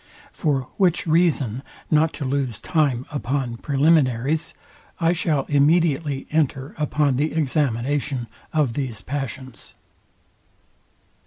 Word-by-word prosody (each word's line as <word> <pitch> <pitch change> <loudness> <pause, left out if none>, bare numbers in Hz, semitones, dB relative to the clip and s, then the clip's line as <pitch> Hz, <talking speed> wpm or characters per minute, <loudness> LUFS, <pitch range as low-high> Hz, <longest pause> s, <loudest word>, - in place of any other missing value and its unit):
For 135 -5 -1
which 180 -3 +2
reason, 155 -8 +2 0.3
not 155 +1 +4
to 145 - -5
lose 130 -3 -1
time 145 -7 +1
upon 135 -4 -2
preliminaries, 140 0 +2 0.4
I 165 -1 +3
shall 160 -5 +1
immediately 145 -1 +2
enter 145 -3 0
upon 145 -3 +1
the 150 +3 0
examination 140 -3 0 0.3
of 150 -7 +1
these 125 -7 -4
passions. 135 -2 -6
145 Hz, 100 wpm, -23 LUFS, 130-155 Hz, 0.4 s, not